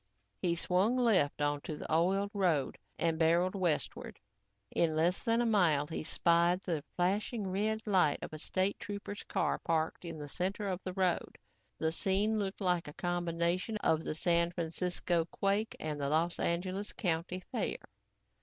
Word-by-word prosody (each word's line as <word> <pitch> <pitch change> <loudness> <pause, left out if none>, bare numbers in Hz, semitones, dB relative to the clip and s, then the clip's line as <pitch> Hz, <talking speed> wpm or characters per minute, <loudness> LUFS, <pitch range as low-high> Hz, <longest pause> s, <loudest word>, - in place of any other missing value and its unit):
He 170 -1 +1
swung 185 +8 +2
left 185 - +3
onto 145 +1 -2
the - - -4
oiled 195 +5 +2
road 175 -9 +1 0.2
and 165 -1 0
barreled 170 +3 +3
westward. 180 -6 -1 0.5
In 160 -2 +2
less 170 +4 +2
than 230 +1 +2
a - - +1
mile, 175 -10 +3
he 160 - -4
spied 170 +3 +2
the 165 -7 -2
flashing 200 +4 0
red 215 +4 -1
light 185 -8 +3
of - - -7
a 155 - -6
State 185 +5 0
trooper's 205 0 -6
car - - -1
parked 160 +1 -1
in 165 -2 -6
the 145 -1 -6
center 190 +7 -2
of 185 -1 -2
the 185 - -5
road. 185 -2 0 0.4
The 160 0 0
scene 200 +5 +1
looked 195 0 -3
like 180 -4 +1
a 150 - -8
combination 175 +4 -1
of 160 -6 +1
the - - -3
San 170 +1 +2
Francisco 175 0 -1
quake 200 +5 -1
and 150 -2 -3
the 140 - 0
Los 165 +3 +1
Angeles 185 +4 -1
county 175 +1 -2
fair. - - -1
175 Hz, 165 wpm, -33 LUFS, 165-195 Hz, 0.5 s, left